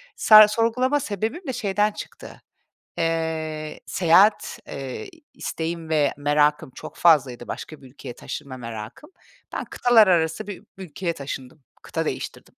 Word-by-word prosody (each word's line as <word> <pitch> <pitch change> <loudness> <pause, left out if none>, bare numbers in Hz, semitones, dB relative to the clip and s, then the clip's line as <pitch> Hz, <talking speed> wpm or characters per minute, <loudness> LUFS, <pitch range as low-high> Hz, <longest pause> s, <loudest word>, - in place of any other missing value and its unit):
Sa 215 -1 +8
sorgulama 235 +6 +1
sebebim 225 - -4
de 260 - -2
şeyden 210 -2 0
çıktı. - - -10 0.6
Eee, 160 -2 -2
seyahat, 190 +4 +3
eee, 135 - -6 0.3
isteğim 165 0 -5
ve 150 -3 +2
merakım 145 -1 +1
çok - - -10
fazlaydı, 135 -8 +3
başka 155 -3 -7
bir - - -13
ülkeye 130 -2 -10
taşınma 140 -1 -7
merakım. 115 - -9 0.4
Ben - - -3
kıtalar 230 -4 +4
arası 165 +3 +1
bir 205 -1 -8
ülkeye 180 -1 -4
taşındım, 140 0 -8 0.2
kıta - - -3
değiştirdim. - - -5
165 Hz, 130 wpm, -23 LUFS, 145-210 Hz, 0.6 s, Sa